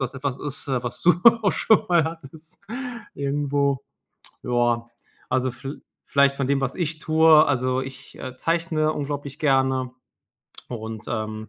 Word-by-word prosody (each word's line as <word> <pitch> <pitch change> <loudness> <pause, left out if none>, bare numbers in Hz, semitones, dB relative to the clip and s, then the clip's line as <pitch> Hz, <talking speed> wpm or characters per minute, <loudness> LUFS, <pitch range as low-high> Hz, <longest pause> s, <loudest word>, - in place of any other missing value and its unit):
das 130 - -6
etwas 135 -1 -3
ist, 145 -1 -5
äh, 130 -2 0
was 120 -1 -5
du 175 - +6 0.3
auch 200 - +3
schon 220 - +3
mal 170 -3 +4
hattest 160 +1 -9 0.5
irgendwo. 140 -1 0 0.6
Ja, 120 -1 +1 0.4
also, 130 0 +1
viel 135 +3 -8 0.2
vielleicht 140 0 +3
von 140 -1 -1
dem, 140 0 +1
was 135 -1 -2
ich 160 -3 -2
tue. 160 0 +6
Also, 130 -1 +1
ich, 135 0 -9
äh, 130 -1 -7
zeichne 165 -1 0
unglaublich 145 0 -5
gerne 130 -3 +2 0.8
und, 110 -2 -6
ähm, 110 -1 -4
140 Hz, 145 wpm, -24 LUFS, 130-155 Hz, 0.8 s, du